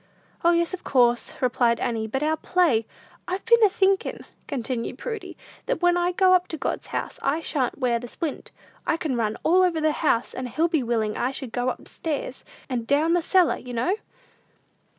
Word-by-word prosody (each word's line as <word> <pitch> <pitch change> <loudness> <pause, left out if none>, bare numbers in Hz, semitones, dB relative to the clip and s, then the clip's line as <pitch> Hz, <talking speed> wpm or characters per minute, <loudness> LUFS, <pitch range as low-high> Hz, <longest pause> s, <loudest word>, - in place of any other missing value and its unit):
"O, 340 - +5
yes, 340 +1 +1
of 370 - -5
course," 240 -2 +2
replied 240 -2 +2
Annie, 225 -2 -1
"but 265 +6 -2
our 310 +1 +2
play 315 -9 +2 0.2
" - - -28
"I've 370 +2 -3
been 470 -1 +5
a 420 - +7
thinkin'," 385 0 +1 0.2
continued 250 -3 -3
Prudy, 450 -4 -6 0.3
"that - - -1
when 350 0 +5
I 350 0 +1
go 370 +1 +4
up 365 -1 +3
to 320 - -5
God's - - -3
house, - - -4
I 295 +4 +1
shan't 275 -6 -2
wear 245 -3 +1
the 245 - -8
splint. 310 +4 -5 0.4
I 325 - +2
can 305 -6 -2
run 220 -2 -1
all 360 +3 +4
over 355 -3 +2
the 310 0 +2
house, 290 -6 0
and 255 -1 -5
he'll 310 +8 +1
be 325 -4 +1
willing 225 -3 -1
I 250 - 0
should 265 -3 -6
go 245 0 0
up - - -6
stairs, 290 -4 -4 0.2
and 240 -3 -3
down 325 +5 +3
cellar, 360 +1 +3
you 250 - -9
know." 345 - +1
300 Hz, 200 wpm, -25 LUFS, 245-350 Hz, 0.4 s, a